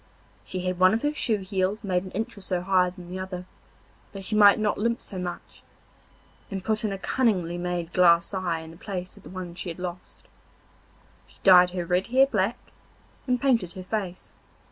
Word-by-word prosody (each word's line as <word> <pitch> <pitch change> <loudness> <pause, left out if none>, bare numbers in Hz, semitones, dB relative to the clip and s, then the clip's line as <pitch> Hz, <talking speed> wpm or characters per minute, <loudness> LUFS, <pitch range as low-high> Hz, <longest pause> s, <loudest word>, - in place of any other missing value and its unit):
She 185 - -5
had 185 0 -2
one 185 +3 +6
of 230 - -3
her 295 0 +1
shoe 220 -8 0
heels 190 +2 -1
made 185 -2 0
an 190 - -8
inch 220 +2 -3
or 200 - -12
so 185 -2 -1
higher 185 -1 +3
than 180 -1 -12
the 185 - -4
other, 185 -1 -6 0.7
that 195 -1 -5
she 215 - 0
might 205 -1 +7
not 215 -2 0
limp 235 +2 0
so 190 - -7
much, 175 -1 -7 0.9
and 195 -2 -5
put 215 +1 0
in 215 - 0
a 195 - -3
cunningly 190 -6 0
made 175 -1 -3
glass 170 0 +4
eye 175 -4 -1
in 160 0 -10
the 165 - -14
place 185 -2 -6
of - - -16
the - - -12
one 185 -2 -7
she 175 +1 -5
had 165 - -6
lost. 180 0 -8 1.0
She - - -22
dyed 180 -2 +8
her 180 -1 -4
red 180 +2 +1
hair 260 +3 +5
black, 220 -2 0 0.7
and 250 -1 +1
painted 235 -10 +1
her 185 -2 -8
face. 190 -2 -5
185 Hz, 205 wpm, -26 LUFS, 180-210 Hz, 1.0 s, dyed